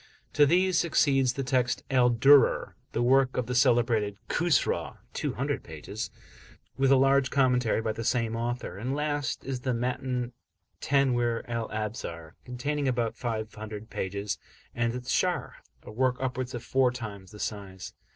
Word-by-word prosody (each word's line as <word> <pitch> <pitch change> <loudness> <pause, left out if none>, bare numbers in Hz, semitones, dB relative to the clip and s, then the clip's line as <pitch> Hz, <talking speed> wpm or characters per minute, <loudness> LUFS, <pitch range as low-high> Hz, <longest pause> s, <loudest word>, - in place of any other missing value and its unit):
To 145 -1 +5
these 180 +2 +3
succeeds 135 -6 +3
the 135 - -3
Text 125 -5 0
"Al 125 -2 +5
Durar," 135 +4 +5 0.2
the 120 - 0
work 130 +1 +3
of 125 - 0
the 125 - -3
celebrated 120 -5 +2
Khusraw, 175 -2 +1 0.2
(200 - - -2
pages), - - -6 0.7
with 135 0 +2
a - - +8
large 135 0 +4
commentary 125 -4 +2
by 110 - 0
the 115 +1 -5
same 115 -1 0
author; 120 -5 -3
and 130 +5 -2
last 145 -2 -2
is 135 -1 -3
the 125 -1 -1
Matn 125 0 -2 0.5
Tanwir 120 -4 +1
Al 115 -1 -3
Absar, 105 -7 -5
containing 140 +3 -2
about 120 -3 0
500 110 -2 -5
pages, 100 +2 -3 0.3
and 120 0 0
its 125 +1 -4
Sharh, 180 -1 0 0.3
a - - -10
work 125 +3 +1
upwards 130 -1 -3
of 120 - -6
four 130 +1 +3
times 105 -6 -7
the 105 - -12
size. 95 -4 -5
125 Hz, 150 wpm, -28 LUFS, 115-135 Hz, 0.7 s, a